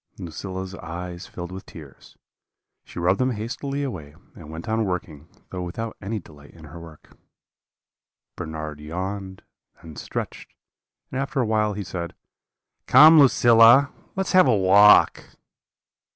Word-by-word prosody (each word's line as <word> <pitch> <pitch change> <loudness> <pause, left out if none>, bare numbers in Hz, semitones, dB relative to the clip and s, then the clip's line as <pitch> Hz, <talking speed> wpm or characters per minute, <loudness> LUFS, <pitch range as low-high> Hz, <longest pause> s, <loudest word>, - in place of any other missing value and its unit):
"Lucilla's 95 +2 -7
eyes 90 +1 -8
filled 90 0 -8
with 95 +1 -8
tears; 75 -5 -14 0.7
she - - -15
rubbed 90 +3 +1
them 130 0 0
hastily 135 +6 -5
away, 80 - -7 0.2
and 80 -3 -13
went 80 +6 -9
on 110 0 0
working, 80 -6 -5 0.2
though 90 - -5
without 110 +6 -6
any 105 +3 -4
delight 75 -6 -14
in 80 - -15
her 75 +3 -11
work. 80 -2 -15 1.2
"Bernard 80 -1 -7
yawned, 95 +5 -6 0.4
then 80 -2 -11
stretched; - - -7 0.6
and 130 - -2
after 140 +1 -3
a 125 - +1
while 105 -1 0
he 100 0 -5
said: 85 -2 -6 0.7
"'Come, 155 +1 +8
Lucilla, 120 0 +5 0.2
let 190 0 -1
us - - -4
have 185 -5 +5
a 120 -4 +3
walk.' 100 +2 +4
95 Hz, 140 wpm, -23 LUFS, 85-115 Hz, 1.2 s, Come